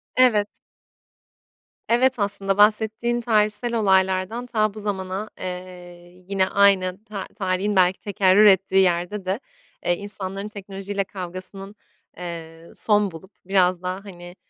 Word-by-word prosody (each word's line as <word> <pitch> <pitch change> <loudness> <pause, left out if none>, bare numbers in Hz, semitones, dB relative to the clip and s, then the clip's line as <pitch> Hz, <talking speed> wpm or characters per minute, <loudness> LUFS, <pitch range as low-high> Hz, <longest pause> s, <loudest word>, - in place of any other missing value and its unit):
Evet. 225 -5 +4 1.4
Evet, 250 +2 +3
aslında 200 -1 -1
bahsettiğin 220 +3 +3
tarihsel 215 +1 +1
olaylardan 190 +3 +1
ta 215 -4 0
bu 215 - -9
zamana, 195 0 -4
eee, 180 -1 -9
yine 190 -1 +1
aynı 195 -1 +2
ta 205 -3 -6
tarihin 195 0 -1
belki 185 0 +3
tekerrür 200 0 +4
ettiği 195 -1 +5
yerde 180 +2 0
de, 190 +4 -1 0.5
eee, 175 - +2
insanların 200 0 -5
teknolojiyle 200 -1 -5
kavgasının, 190 +2 -8 0.4
eee, 165 -1 -8
son 210 -3 +1
bulup 175 +4 -12
biraz 185 -2 +2
daha, 185 +2 -5
hani, 175 -2 -11
195 Hz, 120 wpm, -23 LUFS, 185-210 Hz, 1.4 s, ettiği